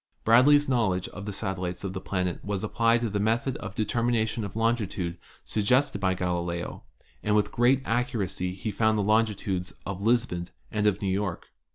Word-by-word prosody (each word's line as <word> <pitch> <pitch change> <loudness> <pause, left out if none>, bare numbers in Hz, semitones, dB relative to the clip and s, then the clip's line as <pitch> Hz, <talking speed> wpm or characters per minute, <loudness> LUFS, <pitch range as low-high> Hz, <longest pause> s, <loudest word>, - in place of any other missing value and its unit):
Bradley's 145 +6 +6
knowledge 110 -8 +1
of 100 +2 -8
the - - -2
satellites 95 -2 -4
of 95 -1 -3
the 95 - -5
planet 90 -2 -2
was 100 -1 -2
applied 115 +2 +2
to 115 - 0
the 105 - 0
method 115 +5 +1
of - - -7
the 110 - +1
determination 115 0 0
of 100 -1 -6
longitude 105 -6 -1 0.2
suggested 110 0 +1
by 95 -1 +2
Galileo, 85 -1 -2 0.4
and 105 0 +1
with 105 - +2
great 125 +3 +3
accuracy 100 -7 -1
he 105 +3 -4
found 110 0 +2
the 105 - +1
longitudes 105 -4 0
of 100 -1 -4
Lisbon 110 -6 +1 0.2
and 105 -1 +1
of 105 0 +1
New 95 - +1
York. 95 -3 -3
105 Hz, 180 wpm, -27 LUFS, 95-115 Hz, 0.4 s, Bradley's